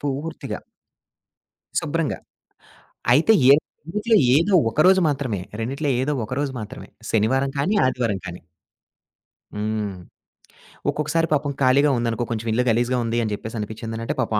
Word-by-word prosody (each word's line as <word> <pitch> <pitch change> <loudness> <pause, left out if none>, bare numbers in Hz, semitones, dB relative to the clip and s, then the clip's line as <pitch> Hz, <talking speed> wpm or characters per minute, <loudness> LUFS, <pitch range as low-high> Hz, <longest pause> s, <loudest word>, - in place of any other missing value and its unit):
పూర్తిగా. 145 +3 -4 1.2
శుభ్రంగా. - - -2 1.0
అయితే 160 - +5 0.2
ఏ 140 - +10 0.4
ఇంట్లో 220 +1 +3 0.2
ఏదో 185 +5 +2 0.2
ఒకరోజు 185 +9 +4
మాత్రమే. 130 -9 -2 0.2
రెండిట్లో 140 +5 -2
ఏదో 150 +2 0
ఒకరోజు 135 +4 -2
మాత్రమే. 115 +6 -9 0.2
శనివారం 130 +5 +2
కానీ, 185 +10 +1
ఆదివారం 115 -6 0
కానీ. 90 +1 -7 1.2
హ్మ్. 105 -2 -2 0.9
ఒక్కొక్కసారి 160 +2 0
పాపం 145 -1 0
ఖాళీగా 140 +3 +4
ఉందనుకో, 120 0 -1
కొంచెం 115 0 -3
ఇల్లు 125 +3 +2
గలీజుగా 120 +2 +1
ఉంది 115 +1 -1
అని 110 - -2
చెప్పేసి 110 +2 -7
అనిపించిందనంటే 115 +2 -4
పాపం 110 -3 0
130 Hz, 120 wpm, -22 LUFS, 110-145 Hz, 1.2 s, ఏ